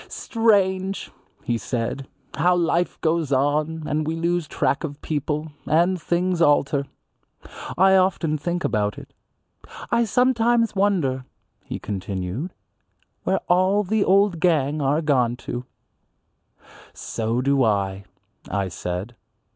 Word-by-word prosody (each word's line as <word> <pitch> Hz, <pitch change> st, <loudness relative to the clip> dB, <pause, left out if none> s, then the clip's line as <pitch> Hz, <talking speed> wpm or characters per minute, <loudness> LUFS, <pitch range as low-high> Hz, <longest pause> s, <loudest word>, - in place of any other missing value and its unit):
"Strange," 195 Hz, -4 st, +1 dB, 0.3 s
he 120 Hz, -1 st, -1 dB
said, 125 Hz, +3 st, -3 dB, 0.3 s
"how 180 Hz, +3 st, +3 dB
life 175 Hz, 0 st, 0 dB
goes 160 Hz, -3 st, 0 dB
on 150 Hz, +4 st, +1 dB
and 155 Hz, +1 st, -1 dB
we 160 Hz, -, -1 dB
lose 170 Hz, 0 st, -1 dB
track 140 Hz, -, 0 dB
of 145 Hz, -2 st, -5 dB
people, 150 Hz, +1 st, -2 dB, 0.2 s
and 175 Hz, +3 st, +2 dB
things 175 Hz, +1 st, 0 dB
alter. 145 Hz, -2 st, +3 dB, 0.9 s
I 190 Hz, +2 st, +6 dB
often 185 Hz, -4 st, +2 dB
think 175 Hz, +4 st, -2 dB
about 105 Hz, -2 st, 0 dB
it. -, -, -12 dB, 0.8 s
I 235 Hz, 0 st, +3 dB
sometimes 235 Hz, -1 st, +2 dB
wonder," 175 Hz, -10 st, +1 dB, 0.4 s
he -, -, -5 dB
continued, 100 Hz, -, -4 dB, 0.7 s
"where 190 Hz, -, +1 dB
all 185 Hz, +3 st, +3 dB
the 210 Hz, +2 st, +1 dB
old 195 Hz, -2 st, +3 dB
gang 155 Hz, -4 st, +2 dB
are 145 Hz, +4 st, +1 dB
gone 125 Hz, -5 st, +2 dB
to." 120 Hz, +1 st, -4 dB, 1.3 s
"So 115 Hz, +2 st, -2 dB
do 135 Hz, +1 st, +2 dB
I," 100 Hz, -3 st, 0 dB, 0.4 s
I 100 Hz, -1 st, -1 dB
said. 90 Hz, +6 st, -5 dB
160 Hz, 120 wpm, -23 LUFS, 130-185 Hz, 1.3 s, I